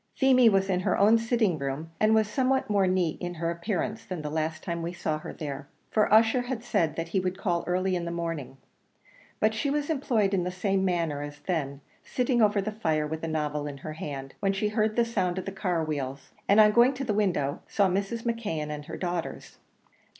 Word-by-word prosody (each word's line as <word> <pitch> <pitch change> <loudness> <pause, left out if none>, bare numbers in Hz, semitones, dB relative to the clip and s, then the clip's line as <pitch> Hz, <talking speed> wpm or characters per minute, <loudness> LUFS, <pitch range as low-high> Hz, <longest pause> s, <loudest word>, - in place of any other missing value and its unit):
Feemy 255 -3 +5
was 195 -2 +2
in 185 -2 +1
her 185 - +1
own 215 +3 +5
sitting 225 -7 +1
room, 140 +4 -4
and 215 +1 +4
was 220 -1 +3
somewhat 260 -1 +1
more 200 -2 +3
neat 180 -4 0
in 175 0 -4
her 165 +1 -1
appearance 205 +5 -3
than 180 -6 -6
the 150 - -4
last 155 0 -2
time 170 -2 -3
we 170 +1 -4
saw 155 -3 -2
her - - -7
there, 140 -2 -6 0.2
for 215 -2 +2
Ussher 225 +3 +5
had 245 -2 -4
said 165 -10 0
he 190 - +1
would 185 0 -2
call 175 -3 0
early 185 +1 +1
in 175 -1 -2
the - - -3
morning; 165 -6 -4 0.8
but 215 +1 +3
she 220 +6 -1
was 290 +2 0
employed 235 -9 +1
in 185 -2 +2
the 180 - -1
same 190 +1 0
manner 165 -6 0
as 145 0 -7
then 140 -6 -2 0.2
sitting 250 -1 0
over 210 -1 +4
the 215 - -2
fire 160 -8 0
with 160 +1 -5
a - - -1
novel 150 -2 -2
in 140 -1 -6
her 155 +3 -7
hand, 135 -3 -6
when 195 -1 +1
she 210 +2 0
heard 215 0 0
the 235 - +3
sound 185 -6 -1
of 185 - -3
the 195 - -4
car 180 -4 -1
wheels, 140 -3 -4 0.2
and 200 +2 +6
on 210 0 +7
going 240 +4 +5
to 270 - -4
the 230 -5 -1
window, 175 -9 0
saw 200 -2 +2
Mrs. 200 +5 -2
McKeon 205 -11 -2
and 150 -1 -6
her 160 - -7
daughters. 175 -2 -4
185 Hz, 225 wpm, -27 LUFS, 160-215 Hz, 0.8 s, on